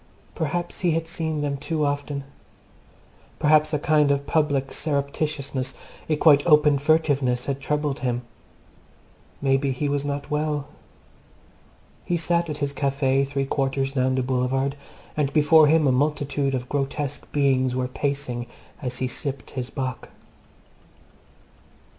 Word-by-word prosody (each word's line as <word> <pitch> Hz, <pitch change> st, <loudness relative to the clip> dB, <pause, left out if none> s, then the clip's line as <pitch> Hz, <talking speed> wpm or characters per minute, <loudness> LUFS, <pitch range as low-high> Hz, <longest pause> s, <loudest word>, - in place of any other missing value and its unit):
Perhaps 175 Hz, +1 st, -3 dB
he 175 Hz, -3 st, +2 dB
had 165 Hz, 0 st, -1 dB
seen 160 Hz, -2 st, -3 dB
them 145 Hz, -1 st, -1 dB
too 150 Hz, +2 st, -1 dB
often. 145 Hz, 0 st, -2 dB, 1.1 s
Perhaps 155 Hz, 0 st, +4 dB
a 150 Hz, -, +1 dB
kind 150 Hz, 0 st, +3 dB
of 140 Hz, 0 st, +1 dB
public 145 Hz, -4 st, +1 dB
surreptitiousness, 140 Hz, -2 st, -2 dB, 0.3 s
a 155 Hz, -, +3 dB
quite 150 Hz, -2 st, +5 dB
open 150 Hz, -3 st, +5 dB
furtiveness, 140 Hz, -5 st, +2 dB
had 140 Hz, 0 st, -3 dB
troubled 150 Hz, -1 st, -1 dB
him. 125 Hz, -1 st, -1 dB, 1.2 s
Maybe 135 Hz, 0 st, +2 dB
he 140 Hz, +3 st, -2 dB
was 140 Hz, 0 st, 0 dB
not 145 Hz, +1 st, -4 dB
well. 150 Hz, -1 st, -1 dB, 1.4 s
He 175 Hz, -, 0 dB
sat 170 Hz, 0 st, 0 dB
at 150 Hz, -, -3 dB
his 140 Hz, -1 st, -2 dB
Café, 140 Hz, -1 st, +1 dB
three 140 Hz, 0 st, -1 dB
quarters 135 Hz, -1 st, -1 dB
down 130 Hz, -1 st, +1 dB
the 130 Hz, -, 0 dB
Boulevard, 130 Hz, +2 st, 0 dB, 0.4 s
and 145 Hz, -2 st, 0 dB
before 155 Hz, 0 st, +6 dB
him 155 Hz, 0 st, +4 dB
a 135 Hz, -, +4 dB
multitude 140 Hz, 0 st, 0 dB
of 125 Hz, -1 st, -4 dB
grotesque 140 Hz, 0 st, -3 dB
beings 130 Hz, -3 st, +2 dB
were 130 Hz, 0 st, 0 dB
pacing 125 Hz, -2 st, -3 dB, 0.3 s
as 125 Hz, -2 st, -3 dB
he 130 Hz, -, -1 dB
sipped 130 Hz, -1 st, -4 dB
his 125 Hz, -2 st, -4 dB
bock. 130 Hz, -2 st, -4 dB
140 Hz, 135 wpm, -24 LUFS, 135-150 Hz, 1.4 s, before